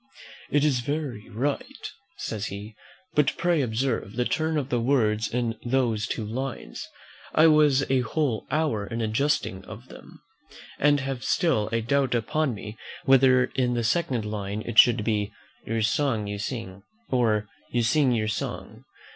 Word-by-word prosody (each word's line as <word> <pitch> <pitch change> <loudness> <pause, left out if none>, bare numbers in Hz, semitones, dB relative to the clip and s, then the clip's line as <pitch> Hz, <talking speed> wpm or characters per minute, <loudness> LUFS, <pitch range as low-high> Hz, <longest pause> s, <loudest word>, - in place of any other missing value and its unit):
'" - - -17
"It 145 -1 +2
is 135 -5 +2
very 130 -4 -4
right," 140 - -3 0.3
says 110 -2 -4
he; 100 +2 -7 0.4
"but 150 -3 +2
pray 175 -3 +2
observe 115 -3 -1
the 125 0 0
turn 160 +3 0
of 140 -2 -3
words 115 -4 +1
in 120 -1 -1
those 120 -4 0
two 110 - -3
lines. 120 - -5 0.5
I 155 - +6
was 150 -4 +5
a 130 -1 +2
whole 125 -1 -1
hour 145 -10 0
in 115 +2 -4
adjusting 110 -3 0
of - - -11
them, - - -13 0.6
and 145 -1 +4
have 135 -3 -4
still 130 - +1
a 115 0 +1
doubt 130 +2 +1
upon 140 +3 0
me 105 +2 -9 0.3
whether 130 -1 +5
in 125 -2 +1
the 120 - 0
second 125 -3 0
line 105 0 -4
it 120 -1 +2
should 120 -3 +6
be, 105 -2 0 0.4
'Your 115 0 0
song 110 -1 +1
you 100 0 -4
sing; 105 -4 -5 0.3
or, 110 -5 +2 0.2
You 120 -1 0
sing 130 +4 +3
your 110 -3 0
song?' 105 - -5
120 Hz, 160 wpm, -26 LUFS, 110-140 Hz, 0.6 s, I